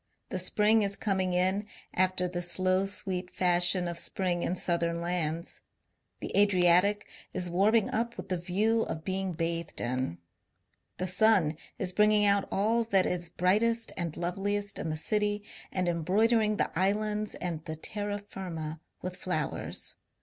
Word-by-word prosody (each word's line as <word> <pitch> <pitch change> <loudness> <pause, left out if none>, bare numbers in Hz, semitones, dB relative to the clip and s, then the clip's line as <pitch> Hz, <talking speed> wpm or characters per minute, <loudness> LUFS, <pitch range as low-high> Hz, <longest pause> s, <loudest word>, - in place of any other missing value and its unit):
The 185 - -2
spring 210 +4 +4
is 200 -1 +1
coming 190 -4 -1
on 190 +3 0 0.3
after 185 0 +1
the 175 0 -4
^'slow, 185 +2 +1
sweet" 185 -2 -1
fashion 180 0 +4
of 170 -1 -4
spring 180 -2 +1
in 180 - -1
southern 170 -2 0
lands; 170 -1 -3 0.6
the - - -5
Adriatic 200 0 +4 0.3
is 180 -1 -2
warming 205 +4 +3
up 235 +1 -2
with 185 +1 -8
the 185 - 0
view 210 +6 +1
of 160 -7 -4
being 190 0 -2
bathed 165 0 -3
in; 125 -7 -2 0.8
the 185 - -2
sun 185 -4 +4 0.2
is 185 -1 -1
bringing 210 +1 +4
out 200 -1 +3
all 225 +4 +2
that 195 -4 +3
is 175 -1 -2
brightest 220 +7 +1
and 170 -3 -4
loveliest 200 +3 -2
in 165 - -3
the 155 - -2
city 205 +4 0 0.3
and 185 -1 -1
embroidering 210 +6 +2
the - - 0
islands 210 +3 0
and 170 -3 -4
the 160 -2 -4
terra 205 +5 -3
firma 165 -6 -6 0.2
with 180 0 -4
flowers. 180 -5 -3
185 Hz, 150 wpm, -29 LUFS, 175-205 Hz, 0.8 s, spring